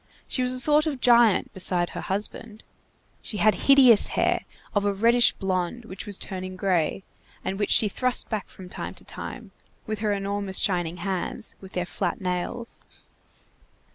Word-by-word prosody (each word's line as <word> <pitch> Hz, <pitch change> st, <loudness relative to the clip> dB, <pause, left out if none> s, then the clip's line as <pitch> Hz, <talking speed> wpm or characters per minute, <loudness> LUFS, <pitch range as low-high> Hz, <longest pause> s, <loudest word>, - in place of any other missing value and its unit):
She 255 Hz, -, -1 dB
was 250 Hz, 0 st, +1 dB
a 255 Hz, -, 0 dB
sort 300 Hz, +4 st, +4 dB
of 280 Hz, -4 st, -3 dB
giant, 235 Hz, -5 st, +4 dB
beside 180 Hz, -2 st, +1 dB
her -, -, -6 dB
husband. 210 Hz, +2 st, -4 dB, 0.6 s
She 210 Hz, -, -4 dB
had 215 Hz, +1 st, +4 dB
hideous 255 Hz, +1 st, +6 dB
hair, -, -, +1 dB, 0.3 s
of 205 Hz, -2 st, +1 dB
a 205 Hz, -, +2 dB
reddish 235 Hz, +4 st, +5 dB
blond 190 Hz, +4 st, -2 dB
which 190 Hz, -1 st, -8 dB
was 205 Hz, -2 st, -1 dB
turning 185 Hz, -1 st, -4 dB
gray, 185 Hz, -1 st, 0 dB, 0.4 s
and 195 Hz, -, -3 dB
which 205 Hz, -, 0 dB
she 215 Hz, -, +5 dB
thrust 255 Hz, +5 st, 0 dB
back 215 Hz, -3 st, -3 dB
from 185 Hz, -, -12 dB
time -, -, -6 dB
to -, -, -8 dB
time, -, -, -8 dB, 0.3 s
with 215 Hz, -1 st, -4 dB
her 210 Hz, -1 st, 0 dB
enormous 200 Hz, -1 st, -1 dB
shining 175 Hz, -3 st, 0 dB
hands, 190 Hz, +4 st, -3 dB
with 190 Hz, -1 st, -12 dB
their 180 Hz, -1 st, -1 dB
flat -, -, -3 dB
nails. 185 Hz, +6 st, -4 dB
205 Hz, 170 wpm, -25 LUFS, 185-235 Hz, 0.6 s, hideous